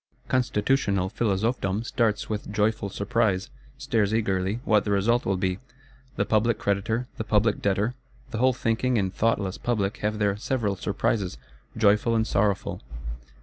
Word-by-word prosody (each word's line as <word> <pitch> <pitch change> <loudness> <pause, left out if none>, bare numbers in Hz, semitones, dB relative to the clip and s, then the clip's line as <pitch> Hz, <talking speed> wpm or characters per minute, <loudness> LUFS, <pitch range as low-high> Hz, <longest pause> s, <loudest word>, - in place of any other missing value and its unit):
Constitutional 105 -5 +1
Philosophedom 110 -1 0
starts 110 -3 0
with 105 -1 -4
joyful 105 -1 0
surprise; 100 +2 0 0.3
stares 115 -7 +1
eagerly 100 -1 0
what 105 -2 +4
the - - -4
result 110 +5 +2
will 95 -1 +1
be. 95 0 -1 0.6
The 100 - 0
public 110 +1 +2
creditor, 110 +3 0
the - - -2
public 105 0 +2
debtor, 100 +4 +1 0.4
the 110 - -3
whole 130 +1 +5
thinking 120 +1 0
and 95 -3 0
thoughtless 100 -4 0
public 105 -4 -1
have 105 +1 -1
their 100 -2 +1
several 110 -3 -1
surprises, 100 - -1 0.4
joyful 110 +2 +3
and 110 -1 +2
sorrowful. 100 -2 0
105 Hz, 145 wpm, -26 LUFS, 100-115 Hz, 0.6 s, whole